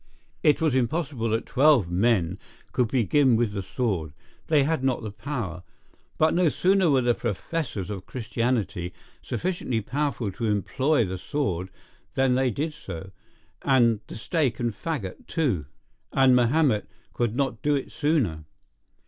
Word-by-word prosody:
It 150 - +4
was 160 -4 +2
impossible 130 -1 0
that 110 +1 0
twelve 135 - +4
men 95 -2 +2 0.3
could 125 - +1
begin 130 +2 +3
with 115 -2 +1
the 100 -1 -3
sword: 95 - -2 0.3
they 150 -3 +4
had 155 -1 0
not 130 -3 0
the 110 - -4
power; 105 -8 -4 0.6
but 155 0 +3
no 175 -1 +4
sooner 190 +2 +3
were 135 -3 +4
the 120 0 +3
professors 115 - -3
of 95 -3 -6
Christianity 110 -7 -2 0.3
sufficiently 170 -10 -2
powerful 130 -2 -2
to 115 +5 -4
employ 115 - +1
the 95 0 -4
sword 95 - -2 0.5
than 135 -2 +3
they 130 0 +2
did 150 +7 -2
so, 95 - -8 0.5
and 120 -5 +4
the - - -8
stake 130 +1 0
and 120 -2 0
faggot 110 - -5
too; 120 - 0 0.4
and 130 -2 +5
Mahomet 125 -2 +3 0.3
could 120 -2 -1
not 135 0 -1
do 145 0 +2
it 135 - -3
sooner. 140 - 0
125 Hz, 150 wpm, -26 LUFS, 105-145 Hz, 0.6 s, and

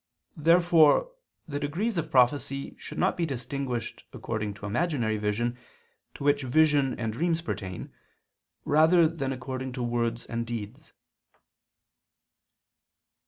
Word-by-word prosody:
Therefore 170 - +4 0.4
the 145 -2 -3
degrees 175 +11 -2
of 165 - -2
prophecy 135 +2 +1
should - - -8
not - - +2
be 170 -2 -1
distinguished 130 -3 -4
according 105 -3 -4
to 100 - -9
imaginary 115 - 0
vision, 115 +4 -1 0.6
to - - -7
which 145 0 +3
vision 140 0 +3
and 115 -2 -2
dreams 165 +5 0
pertain, 95 - -5 0.7
rather 160 +3 +5
than 155 -5 -3
according 130 0 -5
to 125 -1 -3
words 120 -1 -1
and 115 0 -4
deeds. 115 0 -7
135 Hz, 120 wpm, -27 LUFS, 120-155 Hz, 0.7 s, rather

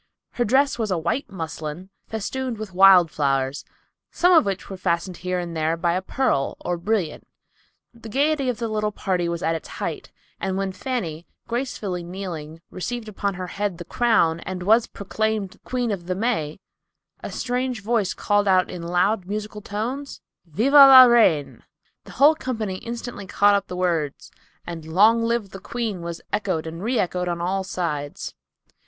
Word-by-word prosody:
Her 240 - -1
dress 265 +3 +2
was 220 -2 -1
a 185 - +1
white 170 - -2
muslin, 160 0 -6 0.2
festooned 235 +3 -3
with 215 -3 -7
wild 185 -3 +7
flowers, 135 -1 0 0.5
some 360 +1 +3
of 325 - +6
which 195 -1 -3
were 195 - -6
fastened 180 0 -2
here 180 +1 -2
and 175 -1 -4
there 160 +1 0
by 170 0 +1
a 185 - 0
pearl 190 - 0
or 175 - -1
brilliant. 175 -2 -2 0.7
The 230 -1 -11
gayety 280 +2 +1
of 245 - -2
the 235 - -2
little 215 -1 -1
party 180 -4 -1
was 170 -1 -3
at 165 - +1
its 165 - -5
height, - - -5 0.3
and 190 -1 -2
when 195 -1 -1
Fanny, 185 -6 -4 0.2
gracefully 230 -7 -3
kneeling, 170 -3 -7
received 220 +5 -5
upon 200 -1 -3
her 185 0 -5
head 195 0 -3
the 175 - -8
crown, 195 -9 +2
and 180 +1 -6
was 220 +4 +4
proclaimed 210 -1 -3
"Queen 245 -3 -1
of 175 -4 -5
the 185 - -1
May," 195 -8 -1 0.6
a - - -6
strange 250 -3 -2
voice 215 -4 0
called 205 -1 +1
out 185 -1 +3
in 180 - -6
loud, 180 +3 0
musical 210 +1 -5
tones, 245 +8 -4 0.3
"Viva 235 - +3
la 270 -2 +11
Reine." 220 - +3 0.4
The - - -12
whole 295 +3 +6
company 225 -10 -4
instantly 235 -3 -6
caught 205 +2 +4
up 200 - 0
the 180 - -6
words, 165 -6 -1 0.3
and 170 -2 -6
"Long 210 +9 +4
live 230 -3 -1
the 195 - -8
Queen" 220 -3 -4
was 170 0 -6
echoed 185 -7 -1
and 165 +1 -7
re 240 +5 0
echoed 180 -2 -1
on 175 -1 -2
all 190 +3 -1
sides. 165 -6 -4
195 Hz, 175 wpm, -23 LUFS, 170-230 Hz, 0.7 s, la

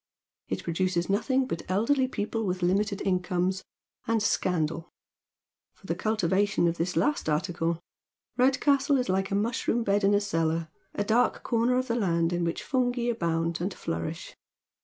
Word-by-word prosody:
It - - -3
produces 175 +1 0
nothing 260 +6 +1
but 170 - -4
elderly 255 +8 +2
people 225 -2 -3
with 185 -2 -2
limited 200 +3 +1
incomes, 185 0 0 0.4
and 230 -1 +2
scandal. 165 -4 0 0.9
For - - -20
the 170 - -1
cultivation 200 -1 +1
of 170 0 -1
tliis 180 +2 -1
last 295 - +1
article 165 +1 -1 0.6
Redcastle 275 +2 +3
is 250 -4 -1
like 190 +1 +1
a 195 - -1
mushroom 230 +2 0
bed 200 -1 +1
in 200 +1 +4
a - - +4
cellar, 165 -4 -1 0.3
a 205 - 0
dark 230 +4 +2
corner 240 +1 +2
of 255 0 0
the 230 - 0
land 170 -7 +1
in 175 0 0
which 170 0 -2
fungi 245 -2 0
abound 165 -5 -1
and 185 +2 -2
flourish. 80 0 -5
195 Hz, 160 wpm, -28 LUFS, 170-235 Hz, 0.9 s, in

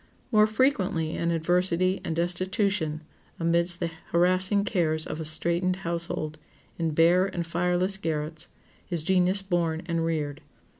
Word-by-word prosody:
More 215 -2 +5
frequently 210 - +1
in 170 - -1
adversity 180 +2 +1
and 160 - -3
destitution, 175 -1 0 0.4
amidst 170 +1 +1
the 170 -2 -2 0.2
harassing 185 +3 +3
cares 160 -7 0
of 155 - -5
a 160 - -4
straitened 170 +4 +1
household, 165 -2 -2 0.4
in 160 -2 -1
bare 175 +4 +4
and 175 -3 -3
fireless 180 +3 0
garrets, 155 -3 -3 0.4
is 170 -3 0
genius 185 +2 +2
born 170 -3 -1
and 170 -1 -1
reared. 155 -3 -2
170 Hz, 135 wpm, -27 LUFS, 165-185 Hz, 0.4 s, More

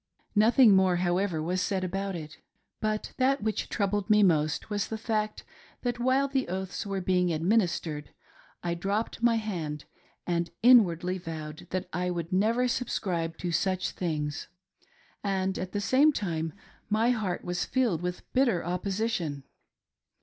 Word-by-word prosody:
Nothing 220 0 +6
more, 190 -1 +4
however, 175 -1 0
was 180 +3 -1
said 190 0 -1
about 195 +1 -2
it. 155 -2 -8 0.4
But 215 -1 -2
that 265 -2 +2
which 215 -2 -1
troubled 205 -1 0
hie 210 0 +6
most 155 -4 +2
was 205 -1 0
the 220 - -4
fact 215 -1 -2 0.4
that 245 -1 -1
while 260 +3 +2
the 270 -1 -1
oaths 190 +2 -4
were 195 -1 -2
being 180 -1 +2
administered, 165 -4 0 0.5
I 170 -1 0
dropped 200 +6 -2
my 235 -1 +4
hand 170 -9 -3 0.4
and 170 -1 0
inwardly 185 -7 +5
vowed 160 -2 -7
that 185 0 -3
I 180 +2 -1
would 170 0 -3
never 225 +6 +2
subscribe 175 -9 -2
to 175 - -3
such 185 +2 0
things, 150 -4 -3 0.8
and 190 -1 -1
at 185 0 -4
the 205 - -1
same 265 +9 +4
time 165 - -2 0.4
my 220 +3 +3
heart 210 -7 -2
was 180 0 -1
filled 235 -11 +1
with 180 0 -4
bitter 240 -11 +2
opposition. 180 -5 -2
190 Hz, 150 wpm, -28 LUFS, 170-215 Hz, 0.8 s, Nothing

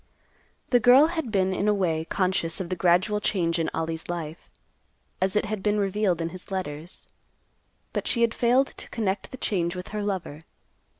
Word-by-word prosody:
The 245 - +6
girl 250 +5 +7
had 320 -9 -3
been 190 -2 +2
in 200 +2 0
a 210 - +4
way 165 -5 0
conscious 185 -2 0
of 180 -3 -4
the 185 - -1
gradual 180 +4 +3
change 170 -5 0
in 165 - 0
Ollie's 160 0 -3
life, 165 -2 -5 0.7
as 190 +1 +1
it 210 - +2
had 210 -1 -3
been 210 +1 +1
revealed 195 -3 +1
in 165 - -1
his 185 +1 -11
letters, 170 -3 -5 0.9
but - - -2
she 235 - +1
had 230 -1 +3
failed 250 +3 +3
to - - -10
connect 200 -4 -2
the 260 - -8
change 175 -8 0
with 180 0 -7
her 210 0 -3
lover. 185 -7 -3
190 Hz, 185 wpm, -26 LUFS, 170-210 Hz, 0.9 s, girl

